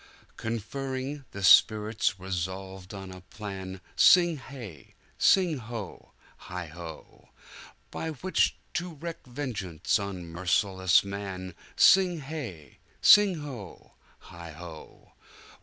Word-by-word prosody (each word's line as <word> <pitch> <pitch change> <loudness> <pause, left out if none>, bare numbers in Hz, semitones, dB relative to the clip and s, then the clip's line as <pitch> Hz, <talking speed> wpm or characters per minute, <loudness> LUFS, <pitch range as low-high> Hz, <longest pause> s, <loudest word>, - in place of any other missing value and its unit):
Conferring, 130 +5 -4
the 100 - -7
spirits 105 +1 +5
resolved 95 +1 -5
on 95 -1 -8
a 90 0 -10
plan 95 -1 -8
Sing 175 -3 +6
hey! 120 - -11 0.2
sing 175 -7 +4
ho! 115 -3 -8 0.4
heigho! 85 -2 -9 0.6
By 160 - -4
which 170 +5 +1 0.2
to 175 -2 -3
wreak 165 +3 -6
vengeance 120 - -2
on 100 -3 -5
merciless 95 +2 +2
man 95 -2 -6 0.2
Sing 185 -2 +6
hey! 130 - -7 0.2
sing 200 -6 +6
ho! 120 -11 -9 0.4
heigho!" 85 -1 -11
100 Hz, 95 wpm, -28 LUFS, 90-140 Hz, 0.6 s, Sing